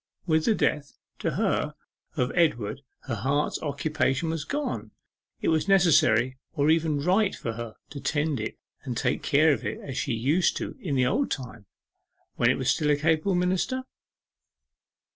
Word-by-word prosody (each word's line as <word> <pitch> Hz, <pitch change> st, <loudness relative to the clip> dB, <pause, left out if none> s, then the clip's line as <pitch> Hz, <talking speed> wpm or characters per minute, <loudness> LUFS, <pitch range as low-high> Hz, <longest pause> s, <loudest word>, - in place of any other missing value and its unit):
With 160 Hz, -3 st, +2 dB
the 225 Hz, -, +3 dB
death 145 Hz, -6 st, -1 dB, 0.2 s
(to -, -, -1 dB
her) -, -, 0 dB, 0.4 s
of 125 Hz, 0 st, +1 dB
Edward 135 Hz, -9 st, +1 dB, 0.2 s
her 125 Hz, -, -5 dB
heart's 140 Hz, +7 st, 0 dB
occupation 150 Hz, 0 st, 0 dB
was 160 Hz, -3 st, -3 dB
gone. 125 Hz, -, -3 dB, 0.5 s
Was 160 Hz, -1 st, +2 dB
it -, -, -6 dB
necessary 130 Hz, -, +4 dB
or 145 Hz, +2 st, +3 dB
even 160 Hz, -3 st, +1 dB
right 190 Hz, +4 st, +2 dB
for 115 Hz, -, -4 dB
her 115 Hz, -1 st, -7 dB, 0.2 s
to 140 Hz, -, -6 dB
tend 150 Hz, -2 st, 0 dB
it 110 Hz, -, -4 dB, 0.2 s
and 125 Hz, -5 st, -5 dB
take -, -, 0 dB
care 150 Hz, +1 st, +4 dB
of 125 Hz, -, -4 dB
it -, -, -3 dB
as 135 Hz, -2 st, -5 dB
she -, -, -1 dB
used 140 Hz, +11 st, +2 dB
to -, -, -5 dB
in 150 Hz, -7 st, -2 dB
the 130 Hz, -1 st, +3 dB
old 265 Hz, -, +1 dB
time, 120 Hz, -6 st, -6 dB, 0.7 s
when -, -, +3 dB
it -, -, +2 dB
was -, -, +1 dB
still 150 Hz, -, 0 dB
a 145 Hz, -, +5 dB
capable 160 Hz, +5 st, +1 dB
minister? 185 Hz, +9 st, 0 dB
150 Hz, 170 wpm, -27 LUFS, 130-165 Hz, 0.7 s, a